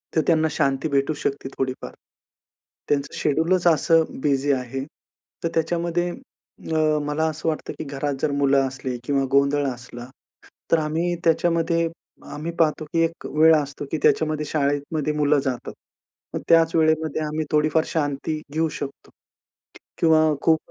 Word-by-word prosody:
तर 160 - +4
त्यांना 160 -2 +3
शांती 135 +3 0
भेटू 140 +2 +1
शकते 140 -1 -2
थोडीफार. 130 -1 -3 1.0
त्यांचं 140 -1 0
शेड्यूलचं 170 +3 +2
असं 165 +2 +3 0.2
बिझी 140 0 +1
आहे. 130 +1 -3 0.6
तर 165 - +1
त्याच्यामध्ये 170 +1 0
अ, 155 - -3
मला 150 +2 -1
असं 155 +1 -5
वाटतं 155 - -4
की - - -3
घरात 140 0 -3
जर 145 - +1
मुलं 140 -1 +3
असले 130 -1 -5
किंवा 140 0 +1
गोंधळ 140 +1 +3
असला 120 -1 -7 0.6
तर 165 - +6
आम्ही 165 +3 -1
त्याच्यामध्ये 165 0 +2 0.5
आम्ही 160 +3 -4
पाहतो, 155 -1 +2
की 165 +2 -2
एक 165 0 -6
वेळ 160 +1 +5
असतो 145 -1 -2
की 160 - 0
त्याच्यामध्ये 155 -1 +2
शाळेमध्ये 145 +1 -1
मुलं 150 -1 +2
जातात. 125 -2 -3 0.6
मग - - -3
त्याच 165 -1 +5
वेळेमध्ये 155 -1 +2
आम्ही 155 +1 -2
थोडीफार 155 +1 +3
शांती 155 0 -2
घेऊ 160 0 +1
शकतो 140 -1 -7 0.9
किंवा 160 -1 +5 0.2
खूप 160 -1 +3
155 Hz, 140 wpm, -23 LUFS, 140-160 Hz, 1.0 s, तर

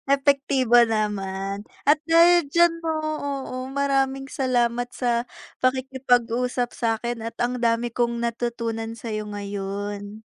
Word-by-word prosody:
Epektibo 275 -3 +3
naman, 200 -2 -2 0.2
at 300 - +7
dahil 335 +1 +6
diyan 340 0 +5
'no, 325 -1 -1 0.2
oo, 275 -2 -4 0.2
maraming 270 -1 0
salamat 245 -2 0
sa 240 -1 0 0.4
pakikipag-usap 250 -2 +1
sa'kin 230 0 -2
at 230 - -5
ang 245 +1 0
dami 235 0 +1
kong 235 0 -1
natutunan 230 -1 -3
sa'yo 215 -2 -5
ngayon. 205 +1 -5
240 Hz, 110 wpm, -24 LUFS, 225-265 Hz, 0.4 s, at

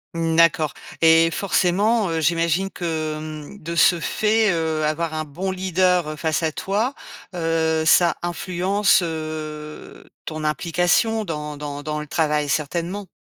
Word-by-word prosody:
Mmh 165 -1 0
d'accord 155 -3 +4 0.3
et 165 0 +6
forcément, 200 +4 +1
heu, 165 -1 -1
j'imagine 170 +3 +1
que, 160 -3 -3
mmh, 155 +5 -8
de 170 +2 -5
ce 170 +1 +4
fait, 215 +5 +1
heu, 160 -2 -1
avoir 155 +2 -1
un 155 0 -2
bon 175 +6 -4
leader, 180 -4 +1
face 160 0 0
à 160 -1 0
toi, 210 - -1 0.4
heu, 165 -1 0
ça 170 +1 +4
influence 185 +3 +1
heu 155 -2 -6 0.2
ton 155 -1 -5
implication 175 +8 +1
dans 150 -3 -5
dans 145 0 -6
dans 150 +1 -3
le 150 - -7
travail, 150 -2 0
certainement? 170 +7 -2
165 Hz, 140 wpm, -22 LUFS, 155-180 Hz, 0.4 s, et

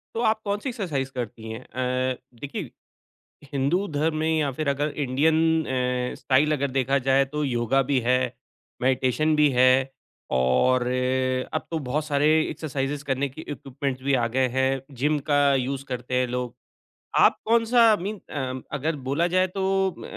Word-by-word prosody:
तो 230 - -1
आप 220 0 +2
कौन-सी 205 +5 -2
एक्सरसाइज़ 160 - -3
करती 115 -2 -6
हैं? 110 - -6
अ, 130 +1 -1 0.2
देखिए, 140 +4 -6 0.8
हिंदू 145 +9 +1
धर्म 155 +2 0
में 160 +1 +1
या 145 -2 +1
फिर 145 +2 -3
अगर 140 +2 +1 0.2
इंडियन 145 +5 +2 0.3
अ, 125 -1 -1
स्टाइल 145 +3 +2
अगर 140 -2 0
देखा 135 +1 +1
जाए, 135 +1 +5
तो 150 +2 -4
योगा 125 0 +1
भी 135 - +3
है, 125 0 +4 0.7
मेडिटेशन 130 +4 +2
भी 150 -1 +5
है 130 +1 +4 0.5
और 95 - +3 0.7
अब 155 - -2
तो 165 - -1
बहुत 150 +4 0
सारे 145 0 +1 0.2
एक्सरसाइज़ेस 140 -1 -3
करने 140 0 -1
के 135 +4 -11
इक्विपमेंट्स 135 -1 -5
भी 140 +1 +1
आ 120 -3 +2
गए 130 - +4
हैं, 130 +1 0
जिम 145 +3 0
का 145 -1 +4
यूज़ 135 +1 -2
करते 125 -1 -4
हैं 130 - +1
लोग। 125 -1 -3 0.6
आप - - +5
कौन-सा 230 +1 +4 0.2
मीन 200 +2 -4
अ, 130 -2 -3 0.2
अगर 155 +3 -1
बोला 165 +5 +2
जाए 185 - +4
तो 190 0 +1
अ, - - -13
135 Hz, 165 wpm, -25 LUFS, 130-155 Hz, 0.8 s, जाए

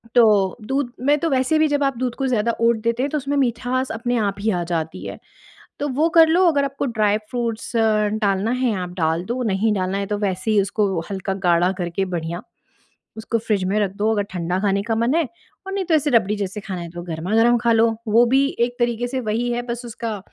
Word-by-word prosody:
तो 210 -5 +4
दूध 270 -1 -1
में 290 +1 +4
तो 330 - 0
वैसे 265 +2 +2
भी 310 - +4
जब 290 -1 0
आप 275 -3 0
दूध 250 -1 -2
को 270 - -1
ज़्यादा 235 -2 +1
ओट 230 0 +4
देते 235 +2 0
हैं 280 - 0
तो 300 - -1
उसमें 285 0 -2
मिठास 255 0 0
अपने 240 +2 -1
आप 205 -3 0
ही 215 +2 0
आ 175 -3 -1
जाती 160 -1 -3
है। - - -6 0.6
तो 290 - -2
वो 295 +5 +1
कर 325 -1 +9
लो 350 +4 +4
अगर 285 -3 +1
आपको 275 0 -3
ड्राई 215 -3 +1
फ्रूट्स 235 -1 -3
अ, 215 -2 +3
डालना 200 +2 +1
है 250 -3 0
आप 180 - -5
डाल 165 +1 0
दो, 245 +5 -3
नहीं 215 0 +1
डालना 185 0 -1
है 200 - -2
तो 205 0 -2
वैसे 195 +1 -1
ही 210 -2 +4
उसको 195 -2 0
हल्का 195 0 -3
गाढ़ा 175 +2 +3
करके 175 +1 -1
बढ़िया 170 +1 -4 0.8
उसको 225 +1 -2
फ़्रिज 215 -3 -1
में 210 - +1
रख 200 -3 0
दो 210 +2 +1
अगर 205 -2 0
ठंडा 180 0 -2
खाने 200 0 +1
का 225 +1 -1
मन 235 +4 +1
है, 330 -4 +1 0.4
और 390 - -6
नहीं 390 -1 -1
तो 335 - 0
ऐसे 295 -1 +1
रबड़ी 215 -5 +3
जैसे 200 0 -4
खाना 185 -3 -5
है 170 - -7
तो 175 0 -7
गरमा-गरम 210 +9 +2
खा 235 0 +1
लो। 225 0 +3
वो 230 +3 +5
भी 265 +3 +3
एक 240 +1 +1
तरीके 240 0 0
से 260 +1 -3
वही 235 +2 -1
है 240 0 -1
बस 240 0 -5
उसका, 225 -2 -5
225 Hz, 235 wpm, -21 LUFS, 195-250 Hz, 0.8 s, कर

